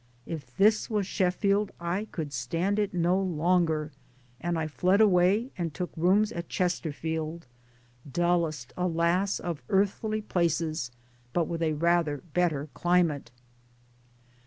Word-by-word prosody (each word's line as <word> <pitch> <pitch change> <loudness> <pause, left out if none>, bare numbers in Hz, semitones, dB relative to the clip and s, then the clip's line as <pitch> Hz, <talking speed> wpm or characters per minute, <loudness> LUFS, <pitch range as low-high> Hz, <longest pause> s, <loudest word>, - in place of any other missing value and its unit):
If 140 -7 -7
this 215 +4 +4
was 210 -3 0
Sheffield 195 +2 +1
I 175 +5 -2
could 150 -4 -4
stand 165 - -1
it 205 -1 0
no 180 +2 +2
longer 165 -3 +1 0.5
and 170 0 -1
I 160 - -1
fled 180 +6 +2
away 205 +4 +4
and 170 -2 -1
took 180 -1 -3
rooms 195 +6 +3
at 170 -4 -6
Chesterfield 160 -2 -2 0.7
dullest 170 -6 0
alas! 180 +2 +1
of 170 -6 -4
earthly 210 +2 +1
places, 165 -7 0 0.4
but 170 -3 +1
with 170 -1 -3
a 160 -1 +1
rather 165 -2 +1
better 160 -5 +1
climate. 175 -7 +1
175 Hz, 125 wpm, -28 LUFS, 160-190 Hz, 0.7 s, this